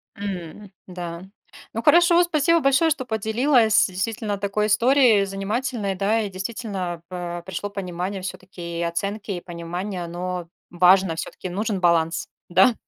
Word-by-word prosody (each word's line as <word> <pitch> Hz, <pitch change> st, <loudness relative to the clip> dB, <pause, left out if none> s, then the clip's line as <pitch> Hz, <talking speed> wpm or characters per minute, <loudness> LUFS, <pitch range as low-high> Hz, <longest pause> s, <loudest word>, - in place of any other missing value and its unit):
М, 195 Hz, 0 st, -6 dB, 0.2 s
да. 175 Hz, -1 st, -6 dB, 0.5 s
Ну 225 Hz, +1 st, -3 dB
хорошо, 345 Hz, 0 st, +6 dB
спасибо 335 Hz, 0 st, +3 dB
большое, 275 Hz, +3 st, +3 dB
что 290 Hz, -5 st, -1 dB
поделилась 220 Hz, +1 st, +3 dB
действительно 205 Hz, +2 st, -3 dB
такой 205 Hz, +1 st, 0 dB
историей 230 Hz, -1 st, +4 dB
занимательной. 200 Hz, +1 st, -2 dB
Да, 205 Hz, +4 st, +1 dB
и 205 Hz, -, -3 dB
действительно 190 Hz, -3 st, -4 dB
па 175 Hz, -1 st, -5 dB
пришло 190 Hz, +2 st, -4 dB
понимание 185 Hz, 0 st, -4 dB
всё-таки 180 Hz, -2 st, -7 dB
и -, -, -1 dB
оценки, 200 Hz, +5 st, -3 dB
и 175 Hz, -, -3 dB
понимание 175 Hz, +2 st, -5 dB
оно 175 Hz, 0 st, -5 dB, 0.2 s
важно. 180 Hz, 0 st, +4 dB
Всё-таки 185 Hz, +2 st, -6 dB
нужен 205 Hz, +2 st, -2 dB
баланс. 165 Hz, -2 st, +2 dB, 0.2 s
Да? 240 Hz, +7 st, +5 dB
195 Hz, 135 wpm, -23 LUFS, 180-220 Hz, 0.5 s, хорошо